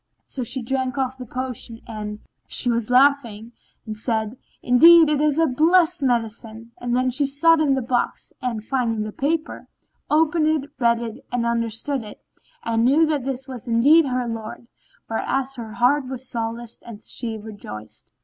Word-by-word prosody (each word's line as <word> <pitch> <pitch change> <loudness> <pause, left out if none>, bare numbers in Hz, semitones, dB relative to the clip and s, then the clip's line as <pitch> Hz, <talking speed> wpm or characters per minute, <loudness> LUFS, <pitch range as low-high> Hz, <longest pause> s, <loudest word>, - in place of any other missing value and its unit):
So 260 - -5
she 250 +2 -1
drank 260 +1 -2
off 260 -1 -2
the 250 - -8
potion 250 -2 -5
(and 210 -2 -6 0.3
she 245 - +3
laughing) 235 -1 +2 0.3
and 215 -1 -5
said, 220 0 -2 0.3
"Indeed, 325 +6 +7
it 300 -1 +1
is 300 -1 +2
a 325 - +4
blessed 325 +4 +3
medicine!" 230 -2 -2
Then 250 +1 0
she 275 +3 +1
sought 315 +4 +4
in 280 -3 +3
the 265 - -2
box 245 0 -2
and, 230 -4 -3
finding 230 -5 -1
the 215 - -5
paper, 310 +7 -3 0.4
opened 315 +1 +2
it, 305 -2 -1
read 235 -1 +2
it, 235 +2 -7
understood 235 +2 -1
it 210 - -11 0.4
and 230 0 0
knew 285 +7 +4
that 295 -5 -1
this 265 0 -4
was 255 -3 -8
indeed 280 +7 +5
her 250 -1 -1
lord, 225 0 -6 0.4
whereas 265 +4 -2
her 230 -4 -8
heart 255 +4 +2
was 260 0 -7
solaced 230 0 -5
and 225 -2 -11
she 230 -3 -5
rejoiced. 110 - -10
250 Hz, 160 wpm, -22 LUFS, 230-280 Hz, 0.4 s, Indeed